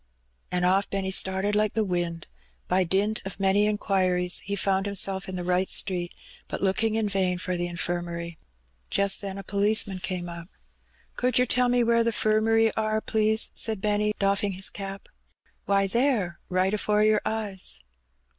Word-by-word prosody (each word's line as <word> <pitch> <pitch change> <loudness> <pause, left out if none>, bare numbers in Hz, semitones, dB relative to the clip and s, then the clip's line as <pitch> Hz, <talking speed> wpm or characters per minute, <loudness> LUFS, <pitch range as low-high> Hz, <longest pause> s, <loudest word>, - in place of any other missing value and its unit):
And 180 0 +1
oflf 190 +2 +2
Benny 195 -1 -2
started, 190 +2 +2
like 210 0 +1
the 220 - +2
wind. 175 -3 -2 0.4
By 185 +1 +2
dint 200 +5 0
of 195 0 -7
many 195 +2 +3
inquiries 185 -4 0
he 200 - -3
found 195 0 0
himself 195 -1 -1
in 185 - -5
the 180 - -4
right 180 +1 +1
street, 175 -3 -1 0.4
but - - -4
looking 215 +3 +1
in 220 -1 0
vain 190 -2 0
for 180 0 -3
the 175 0 -1
Infirmary. 170 -1 -4 0.5
Just 200 -1 +2
then 195 -1 -5
a 195 - -7
policeman 200 -1 +1
came 180 -1 -4
up. 170 0 -8 0.7
"Could 250 -1 +1
yer 250 - +4
tell 250 0 +2
me 245 0 +3
where 230 0 +3
the 230 - +1
'firmary 225 0 +2
are, 215 0 0
please?" 220 0 +1
said 220 -3 -1
Benny, 210 +1 0
doffing 200 0 +1
his 190 +2 0
cap. 195 -1 -7 0.6
"Why, 195 0 +2
there, 215 -5 0
right 185 +2 +1
afore 210 0 +1
your 215 0 +3
eyes." 205 - +1
195 Hz, 170 wpm, -26 LUFS, 185-215 Hz, 0.7 s, yer